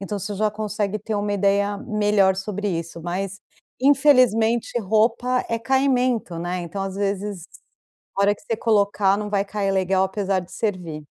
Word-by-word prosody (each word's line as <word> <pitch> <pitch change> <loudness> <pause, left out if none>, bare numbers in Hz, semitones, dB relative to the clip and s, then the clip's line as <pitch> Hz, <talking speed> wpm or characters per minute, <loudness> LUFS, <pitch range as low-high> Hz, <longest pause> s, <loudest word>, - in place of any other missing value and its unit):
então 200 +1 -4
você 205 +1 -4
já 215 +2 +1
consegue 210 -1 -2
ter 215 +1 -4
uma 205 0 -1
ideia 200 0 +1
melhor 205 -3 +2
sobre 205 +1 -3
isso, 170 -2 -4
mas, 185 +3 -4 0.4
infelizmente, 250 -5 +4
roupa 225 +4 +1
é 230 - -1
caimento, 250 -6 +1
né, 175 +2 -3
então 175 +3 -5
às 195 0 -5
vezes, 200 -2 -3 0.7
hora 200 +1 +4
que - - -21
você 230 -7 -2
colocar 205 -3 +2
não 210 0 -4
vai 200 -1 +1
cair 200 -1 -1
legal, 190 0 +2
apesar 190 0 -1
de 180 - -13
servir. 180 -8 -3
205 Hz, 160 wpm, -23 LUFS, 190-220 Hz, 0.7 s, infelizmente